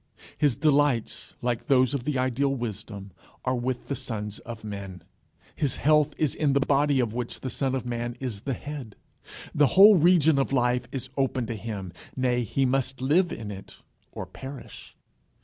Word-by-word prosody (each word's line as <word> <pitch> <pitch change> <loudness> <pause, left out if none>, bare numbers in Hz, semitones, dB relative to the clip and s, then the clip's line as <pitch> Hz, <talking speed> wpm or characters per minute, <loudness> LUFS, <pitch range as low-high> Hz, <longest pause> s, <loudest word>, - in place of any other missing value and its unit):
His 145 -5 +2
delights, 145 -6 +1
like 120 -1 -1
those 130 -1 +4
of 130 -3 -2
the 150 -3 0
Ideal 130 +2 +1
Wisdom, 105 -4 -6 0.3
are 130 - +1
with 125 0 -3
the 140 - -2
sons 105 -4 -4
of 115 -2 -9
men. 100 -3 -7 0.5
His 140 -5 0
health 150 0 +3
is 150 -4 +1
in 145 -3 +1
the 140 - +4
body 140 0 +2
of 115 -4 0
which 120 0 -4
the 130 - -4
Son 135 -1 0
of 130 - -3
Man 120 0 -3
is 120 -7 -4
the 135 +1 -2
head. 140 -7 -7 0.6
The 145 -1 +4
whole 205 +1 +10
region 160 -3 +5
of 135 - 0
life 125 -1 +1
is 130 -1 -4
open 130 -2 0
to 115 - -4
him 100 -4 -6 0.2
nay, 125 -1 +1
he 130 +4 0
must 130 0 0
live 155 +7 +2
in 105 -2 -5
it 100 -1 -11 0.3
or - - -6
perish. 135 0 -10
130 Hz, 180 wpm, -26 LUFS, 115-140 Hz, 0.6 s, whole